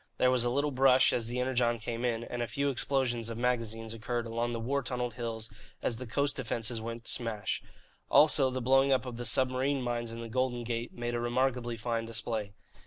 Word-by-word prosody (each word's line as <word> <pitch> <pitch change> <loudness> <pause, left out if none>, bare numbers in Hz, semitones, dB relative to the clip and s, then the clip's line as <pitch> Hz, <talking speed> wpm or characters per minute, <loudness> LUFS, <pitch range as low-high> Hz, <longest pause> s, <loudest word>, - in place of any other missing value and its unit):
There 125 - +4
was 125 -2 +2
a 120 - +1
little 140 +4 +1
brush 130 0 +5
as 115 -2 +1
the 120 +2 -2
Energon 125 -2 +1
came 115 +1 -4
in, 115 -2 0
and 120 0 -4
a 120 - -1
few 140 +4 0
explosions 120 -3 0
of 115 - -5
magazines 115 -2 -1
occurred 120 +1 -3
along 115 +1 -1
the 115 - -3
war 140 +5 0
tunnelled 125 -1 -2
hills 115 -2 -4 0.4
as 115 - 0
the 125 +1 -6
coast 140 +4 0
defences 115 -2 -1
went 115 +1 -6
to - - +2
smash. 115 -4 -2 0.5
Also, 145 -3 +6
the 130 -1 -3
blowing 135 +2 +4
up 130 -1 +2
of 120 -2 -6
the 120 - -4
submarine 130 +4 +2
mines 120 -1 -2
in 115 - -6
the 115 - -5
Golden 120 0 -1
Gate 115 0 -3
made 120 0 -4
a 120 - 0
remarkably 120 0 0
fine 115 0 -2
display. 115 -2 -3
120 Hz, 215 wpm, -31 LUFS, 115-130 Hz, 0.5 s, Also